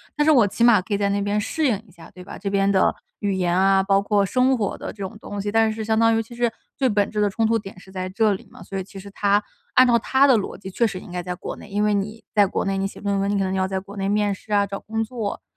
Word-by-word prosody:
但 295 - +2
是 305 - +3
我 255 -8 +6
起 205 +4 -1
码 235 -3 +7
可 205 +3 -5
以 - - +2
在 200 0 +1
那 200 - 0
边 205 +1 0
适 315 +8 -1
应 220 -6 +1
一 - - -19
下， 165 -1 -15
对 180 - -12
吧？ - - -9
这 200 0 -4
边 200 0 +2
的 190 - +3 0.3
语 200 -1 -1
言 180 -2 0
啊， 195 0 +4
包 195 0 +3
括 205 0 +2
生 255 +6 +2
活 205 -5 -2
的 - - -6
这 - - -24
种 200 +2 -6
东 205 -2 -6
西。 205 +1 -3
但 225 0 +3
是 220 0 -5
相 220 0 +1
当 225 0 +4
于 225 - +1
其 230 +2 -11
实， 240 -1 +1 0.3
最 265 - +2
本 205 -3 +1
质 210 - -3
的 205 -1 +2
冲 225 +3 +1
突 230 +1 +2
点 195 -3 -9
是 190 - -16
在 185 -1 -4
这 205 +3 +2
里 190 - -7
嘛。 - - -14
所 195 +2 -6
以 190 - -2
其 195 +1 -11
实 200 +1 -10
他 205 +1 +1 0.3
按 255 0 +6
照 235 - +5
他 265 +5 +3
的 255 -4 +5
逻 200 - -4
辑 190 - -9
确 235 +5 +1
实 195 -5 -2
应 - - -12
该 180 0 -4
在 180 0 -4
国 175 - -6
内， - - -12
因 205 +1 -1
为 210 -1 +2
你 210 +3 -3
在 205 -1 +6
国 190 - -2
内 195 0 -1
你 195 - -1
写 195 - -6
论 200 -1 -1
文， 200 +1 0
你 - - 0
可 195 - +1
能 185 - -1
要 190 0 +1
在 190 0 -2
国 200 +2 -12
内 195 0 -1
面 205 0 +1
试 210 +2 -8
啊， 200 -1 +3
找 195 0 -5
工 225 +1 -3
作， 220 -2 -4
205 Hz, 350 characters per minute, -23 LUFS, 195-220 Hz, 0.3 s, 码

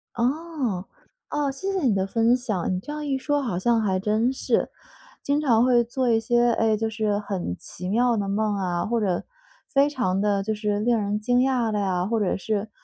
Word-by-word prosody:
哦， 255 - -1 0.5
哦， 295 -2 0
谢 380 +9 -4
谢 385 - 0
你 225 -5 +3
的 190 0 0
分 230 +4 +3
享， 215 -9 -2
你 - - -1
这 295 - -7
样 300 0 -5
一 270 -1 0
说 290 +1 0
好 210 -9 -2
像 230 +4 +2
还 190 -3 +1
真 215 +5 +1
是， 265 - 0 0.5
经 285 +2 0
常 240 -4 +4
会 245 -2 +4
做 245 +1 -1
一 225 - +4
些， 240 +1 +2
诶， 220 -1 +2
就 225 +1 -1
是 215 -2 -1
很 195 - -3
奇 180 +1 -7
妙 240 +3 +2
的 200 -2 -2
梦 210 +1 0
啊， 180 -3 -1
或 230 0 0
者 185 -4 -1 0.4
非 275 +1 +3
常 195 -10 -1
地 200 -1 +1
就 220 +2 -2
是 210 -1 -1
令 235 +1 +2
人 210 0 -1
惊 245 +3 +2
讶 250 -3 +1
的 210 - 0
啊， 180 -2 0
或 225 -1 0
者 195 - 0
是， 215 +1 -2
225 Hz, 230 characters per minute, -24 LUFS, 205-250 Hz, 0.5 s, 常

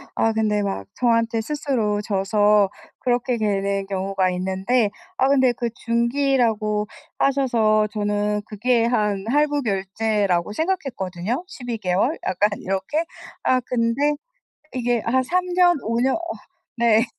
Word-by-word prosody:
아 225 - +2
근데 210 -2 +1
막 145 - -3
저한테 230 -2 +2
스스로 230 -6 -1
져서 205 0 +2 0.3
그렇게 245 0 0
되는 200 -2 0
경우가 195 -1 0
있는데 190 +5 0 0.3
아 265 - +3
근데 260 -2 +4
그 240 0 -3
중기라고 235 -3 0 0.3
하셔서 230 -6 +3
저는 210 0 0
그게 230 +2 +1
한 210 -5 0
할부 290 +3 +2
결제라고 200 -3 0
생각했거든요. 245 - -2
12 245 -10 -6
개월 195 - 0
약간 205 +3 +2
이렇게. 195 - -2 0.4
아 255 - +3
근데 250 +4 0 0.6
이게 245 -2 0
한 260 +3 +2
3 360 +7 0
년, 355 -2 +5
5 230 +2 -1
년 265 +1 +2
어 335 - -2 0.6
네 230 -1 +4
225 Hz, 235 characters per minute, -22 LUFS, 205-255 Hz, 0.6 s, 년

